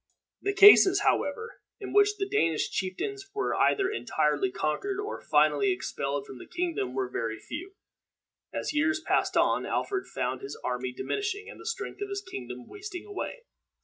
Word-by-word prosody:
The 400 0 -1
cases, 400 -1 +9
however, 440 +8 0 0.2
in 400 - -6
which 410 0 +4
the 390 -1 -1
Danish 165 - +1
chieftains 390 - -3
were 415 - 0
either 390 -2 +3
entirely 155 - 0
conquered 265 - -2
or 410 +2 -4
finally 150 +5 +3
expelled 145 -7 -3
from 130 - -10
the - - -11
kingdom 340 - -2
were 130 -1 0
very 115 -3 -3
few. 365 - -8 0.8
As - - -3
years 315 +1 +2
passed 320 - +1
on, - - +3
Alfred 390 -2 -1
found 130 -1 -3
his 140 - -7
army 125 0 -2
diminishing, 410 - -3
and - - -13
the - - -9
strength 455 -2 -4
of 405 - -3
his 400 0 -3
kingdom 125 - -7
wasting 400 -2 -8
away. 420 +4 -6
335 Hz, 165 wpm, -28 LUFS, -, 0.8 s, cases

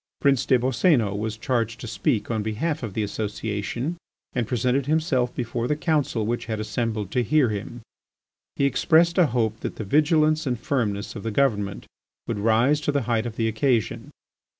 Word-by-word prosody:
Prince 140 -3 +2
des 130 - +5
Boscénos 120 - +2
was 110 +1 -3
charged 115 -2 -1
to - - -7
speak 110 +1 -1
on 110 -2 0
behalf 145 +9 -2
of 110 -6 -6
the 110 - 0
Association 105 - -3 0.4
and 120 -3 -1
presented 125 +3 0
himself 150 -6 +1
before 120 0 -2
the 150 - +1
Council 145 -8 0
which 120 +2 -2
had 110 -1 -2
assembled 110 -1 -2
to 125 - +1
hear 140 +1 +3
him. 105 +3 -5 0.7
He 140 - +1
expressed 165 +6 +3
a 175 - +6
hope 115 -3 -1
that - - -5
the - - -5
vigilance 155 - +3
and 125 -3 -1
firmness 110 -6 -2
of 105 - -5
the 115 - -3
Government 105 -5 0 0.4
would 110 -3 -2
rise 115 +8 +3
to 145 - 0
the 140 -2 0
height 115 0 0
of 115 - -7
the 115 -1 0
occasion. 115 +2 0
120 Hz, 180 wpm, -24 LUFS, 110-140 Hz, 0.7 s, a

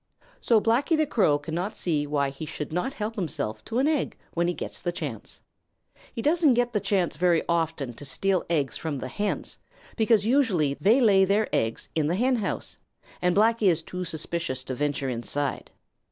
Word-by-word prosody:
So 230 -2 +4
Blacky 250 +9 +2
the 310 - +3
Crow 190 - +2
cannot 170 +8 -4
see 150 -4 0
why 140 -2 0
he 145 +3 -7
should 150 -1 -5
not 255 - -2
help 215 -2 -3
himself 130 - -2
to 230 - -3
an 270 +3 +3
egg 305 -3 0 0.2
when 170 0 +1
he 175 - 0
gets - - -6
the 175 - -1
chance. 145 -11 -6 0.7
He 230 - -5
doesn't 310 -4 +4
get 245 0 +1
the 210 - +2
chance 190 -6 0
very 175 -1 +3
often 160 -6 -1
to 130 - -11
steal 185 +6 +1
eggs 145 -7 0
from 155 -3 -3
the 130 - -5
hens, 205 +9 -3 0.4
because 220 -2 +3
usually 220 - +2
they 215 - +3
lay 200 -5 +5
their 200 +3 +2
eggs 115 0 -1
in 155 -2 +1
the 170 - +1
henhouse, 240 -1 -1 0.4
and 180 0 +2
Blacky 220 0 +3
is 165 -3 +2
too 180 +2 -5
suspicious 165 -5 -3
to 130 - -5
venture 145 0 -1
inside. 130 +3 -3
175 Hz, 185 wpm, -26 LUFS, 145-220 Hz, 0.7 s, lay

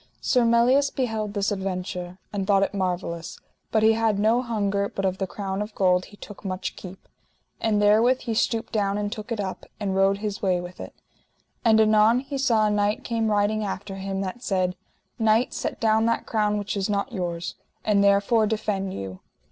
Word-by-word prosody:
Sir 250 -3 +2
Melias 245 +5 +4
beheld 220 -5 -2
this 200 +1 0
adventure, 185 -2 -4 0.2
and 195 -2 -2
thought 195 -1 +4
it - - -1
marvellous, 180 -3 -3 0.3
but 220 -1 +2
he 220 0 +6
had 220 -2 +1
no 220 +4 +3
hunger, 200 -4 -1
but 195 - -3
of 190 0 -1
the 190 - -1
crown 195 +1 -4
of 210 +1 -6
gold 180 -1 +2
he 205 - -16
took 205 0 -11
much 185 -2 -4
keep; 185 0 -11 0.5
and 215 -2 +1
therewith 220 +5 +4
he 230 - -3
stooped 225 +1 0
down 200 -2 +1
and 205 0 -2
took 215 +1 -7
it 230 - -2
up, 190 -2 -4 0.2
and 195 -2 -2
rode 195 +1 +3
his 210 0 -4
way 185 -3 +2
with 175 +1 -9
it. - - -8 0.7
And 220 -2 +5
anon 220 +2 +5
he 275 0 -5
saw 230 -6 +3
a 210 - +2
knight 205 0 0
came 225 -2 -1
riding 210 +1 +1
after 195 -1 -5
him 195 0 -3
that 195 +5 -5
said: 185 -5 0 0.4
Knight, 225 +2 +3
set - - -3
down 220 0 +3
that 230 - 0
crown 210 -2 +1
which 205 +1 -3
is 200 0 -1
not 205 +5 -1
yours, 175 -3 -3 0.3
and 205 -2 +3
therefore 200 +3 +3
defend 205 -3 -2
you. 95 -1 -6
205 Hz, 195 wpm, -25 LUFS, 195-220 Hz, 0.7 s, he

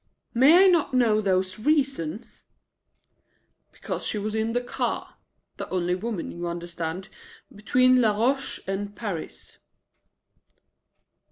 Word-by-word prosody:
"May 290 +10 +7
I - - +7
not 340 -7 +2
know 225 -4 +3
those 185 -1 0
reasons?" 255 - -1 1.2
"Because - - -5
she - - -2
was 210 +1 -3
in 220 +1 -1
the 245 - +2
car 245 - -4 0.4
the - - -6
only 180 -1 0
woman, 200 -1 -4
you 175 0 -5
understand 170 +1 -5 0.5
between 255 +4 +3
Laroche 235 +6 +1
and 200 +1 -4
Paris." 195 -8 -7
215 Hz, 110 wpm, -25 LUFS, 185-250 Hz, 1.2 s, May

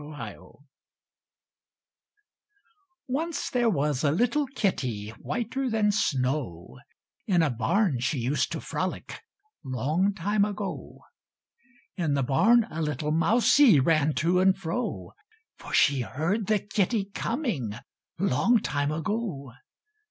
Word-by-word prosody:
KITTY 105 - -7 2.7
Once 320 +6 -2
there 245 -3 +2
was 150 - 0
a 145 - +3
little 245 - +1
kitty 130 - -2
Whiter 250 +3 -3
than 215 -2 +2
snow; 130 - -2 0.5
In 175 -5 +3
a 150 - +1
barn 150 - +1
she 135 +4 -1
used 130 +4 0
to - - -3
frolic, - - -4 0.4
Long 155 - 0
time 200 +3 +1
ago. 205 -1 -5 1.0
In 160 -6 0
the 140 - +1
barn 215 - +4
a 160 - -4
little 150 -1 -2
mousie 215 - +5
Ran 155 +1 +2
to 175 +3 +2
and 190 0 +4
fro; 195 +6 -4 0.5
For - - -10
she 140 -3 +3
heard 170 - -2
the 215 - +3
kitty 205 +1 -1
coming, 225 - -2 0.4
Long 195 - +3
time 145 -3 -1
ago. 160 - -3
170 Hz, 115 wpm, -27 LUFS, 140-215 Hz, 2.7 s, mousie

